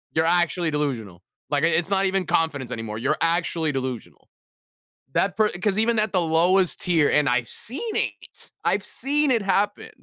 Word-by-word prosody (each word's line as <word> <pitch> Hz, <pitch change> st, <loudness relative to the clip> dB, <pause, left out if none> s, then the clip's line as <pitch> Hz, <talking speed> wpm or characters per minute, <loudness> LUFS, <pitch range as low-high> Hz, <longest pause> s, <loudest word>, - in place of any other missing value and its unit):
You're 160 Hz, 0 st, +2 dB
actually 175 Hz, -1 st, +1 dB
delusional. 115 Hz, -12 st, -3 dB, 0.3 s
Like, 145 Hz, -1 st, 0 dB
i -, -, +5 dB
it's 170 Hz, +1 st, 0 dB
not 195 Hz, -1 st, +2 dB
even 190 Hz, -1 st, 0 dB
confidence 145 Hz, -6 st, -1 dB
anymore. 110 Hz, -1 st, -5 dB
You're 140 Hz, +7 st, 0 dB
actually 165 Hz, -2 st, +1 dB
delusional." 130 Hz, -3 st, -6 dB, 0.8 s
That 195 Hz, -1 st, +1 dB
per 215 Hz, -1 st, +3 dB
'cause 190 Hz, +2 st, -1 dB
even 225 Hz, 0 st, +2 dB
at 215 Hz, -, 0 dB
the 185 Hz, -, +2 dB
lowest 175 Hz, +3 st, +2 dB
tier 165 Hz, -5 st, +2 dB
and 150 Hz, 0 st, +2 dB
I've 125 Hz, -1 st, +1 dB
seen 430 Hz, -, -3 dB
it. -, -, -4 dB
I've -, -, +1 dB
seen 290 Hz, +2 st, 0 dB
it 235 Hz, -4 st, +2 dB
happen. 200 Hz, +1 st, 0 dB
170 Hz, 175 wpm, -23 LUFS, 145-195 Hz, 0.8 s, i